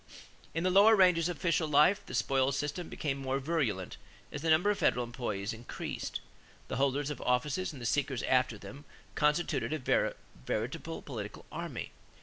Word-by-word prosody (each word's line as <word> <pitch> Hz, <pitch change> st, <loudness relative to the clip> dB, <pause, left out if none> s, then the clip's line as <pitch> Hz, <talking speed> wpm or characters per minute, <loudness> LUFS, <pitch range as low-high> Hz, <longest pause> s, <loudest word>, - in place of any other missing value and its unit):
In 165 Hz, -, 0 dB
the 185 Hz, -, +2 dB
lower 205 Hz, +4 st, +7 dB
ranges 180 Hz, -4 st, +4 dB
of 175 Hz, -, -4 dB
official 170 Hz, -2 st, +1 dB
life, 150 Hz, +7 st, +4 dB
the 125 Hz, -, -5 dB
spoils 135 Hz, +3 st, +2 dB
system 150 Hz, +4 st, -3 dB
became 140 Hz, -2 st, -3 dB
more 135 Hz, 0 st, -1 dB
virulent 135 Hz, -, -1 dB, 0.3 s
as -, -, -5 dB
the 165 Hz, -, 0 dB
number 170 Hz, +6 st, +5 dB
of 205 Hz, -, -2 dB
federal 125 Hz, 0 st, +2 dB
employees 115 Hz, -4 st, -3 dB
increased. 115 Hz, +1 st, -5 dB, 0.5 s
The -, -, -2 dB
holders 140 Hz, +2 st, +1 dB
of 145 Hz, -, -6 dB
offices 135 Hz, +9 st, 0 dB
and 145 Hz, -, -10 dB
the 120 Hz, -, -6 dB
seekers 135 Hz, 0 st, 0 dB
after 125 Hz, -3 st, +2 dB
them 140 Hz, +7 st, -11 dB, 0.3 s
constituted 150 Hz, -4 st, +1 dB
a 145 Hz, -5 st, +1 dB, 0.3 s
veritable 130 Hz, +9 st, -3 dB
political 105 Hz, -7 st, -7 dB
army. -, -, -5 dB
140 Hz, 165 wpm, -31 LUFS, 125-165 Hz, 0.5 s, lower